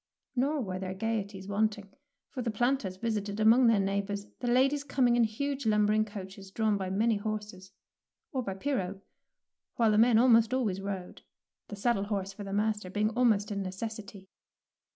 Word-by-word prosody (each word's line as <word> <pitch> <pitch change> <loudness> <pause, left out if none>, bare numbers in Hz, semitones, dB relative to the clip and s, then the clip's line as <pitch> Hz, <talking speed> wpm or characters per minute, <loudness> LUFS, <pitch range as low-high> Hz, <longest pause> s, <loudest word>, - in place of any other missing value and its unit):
Nor 280 +4 +1
were 185 -5 -4
there 190 0 -4
gaieties 200 -2 -3
wanting, 205 -1 -1 0.4
for 255 - -4
the 240 - -2
planters 230 -3 0
visited 210 -1 -2
among 230 +3 +6
their 225 -3 +4
neigh 195 +1 +1
bours, 200 0 -5
the 245 - -3
ladies 270 +4 +3
coming 255 -4 +2
in 240 - +4
huge 275 +3 -3
lum 210 -1 +3
bering 215 +1 +2
coaches 195 -2 -9
drawn 215 +1 +1
by 190 -2 -3
many 215 +3 +2
horses, 205 -2 -5 0.6
or 265 - -1
by 195 -5 -4
pirogue, 195 -5 -2 0.7
while 230 -2 +3
the 210 - +3
men 230 0 +5
almost 230 0 +5
always 205 -7 -1
rode, 195 -2 -6 0.5
the 205 - -7
saddle 200 -1 0
horse 195 -2 -3
for 205 - -8
the 195 - -7
master 210 -1 -1
being 210 +3 0
almost 220 -4 +2
a - - -2
necessity. 200 0 -6
210 Hz, 175 wpm, -30 LUFS, 195-230 Hz, 0.7 s, among